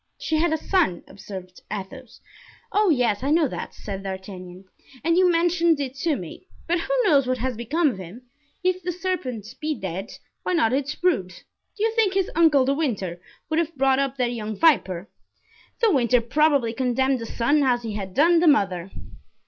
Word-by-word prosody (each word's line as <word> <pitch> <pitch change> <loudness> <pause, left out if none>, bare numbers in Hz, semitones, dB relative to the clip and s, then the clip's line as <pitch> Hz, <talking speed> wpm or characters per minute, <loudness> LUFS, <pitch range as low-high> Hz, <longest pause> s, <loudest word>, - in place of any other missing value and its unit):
"She 315 - -1
had 340 0 +2
a 315 - +1
son," 315 - 0
observed 185 -2 -10
Athos. 215 +5 -8 0.5
"Oh! 415 -1 +3
yes, 245 -9 +2
I 275 - -1
know 315 0 +3
that," - - -7
said 195 -2 -6
D'Artagnan, 190 -1 -8 0.4
"and 335 +2 +2
you 365 0 +5
mentioned 335 -1 +2
it 265 -2 -3
to 305 +2 0
me; 185 - -9 0.2
but 345 +1 +1
who - - -2
knows 285 - +4
what 255 0 0
has 250 +1 -2
become 295 +8 +1
of 190 - -9
him? 190 +7 -10 0.4
If 370 0 +1
the 360 - -2
serpent 335 - -3 0.2
be 305 0 -1
dead, 190 0 -5 0.3
why - - -2
not 255 -9 +2
its 285 +2 -1
brood? 350 - +1 0.5
Do 420 - -2
you 450 - +2
think 440 -4 +1
his 390 -2 +1
uncle 310 -5 +4
De 275 - +2
Winter 200 - -2 0.3
would 315 +1 0
have 335 0 -2
brought 265 0 +3
up 275 -1 -1
that 245 -2 0
young 215 -2 -4
viper? 195 - +2 0.7
De 455 -3 +4
Winter 250 -5 +3
probably 275 -1 +2
condemned 260 +1 +1
the 230 - -6
son 285 +8 +1
as 245 -3 +2
he 225 -2 -4
had 195 -2 -6
done 335 +3 +5
the 340 - +3
mother." 190 - +2
265 Hz, 190 wpm, -24 LUFS, 215-330 Hz, 0.7 s, you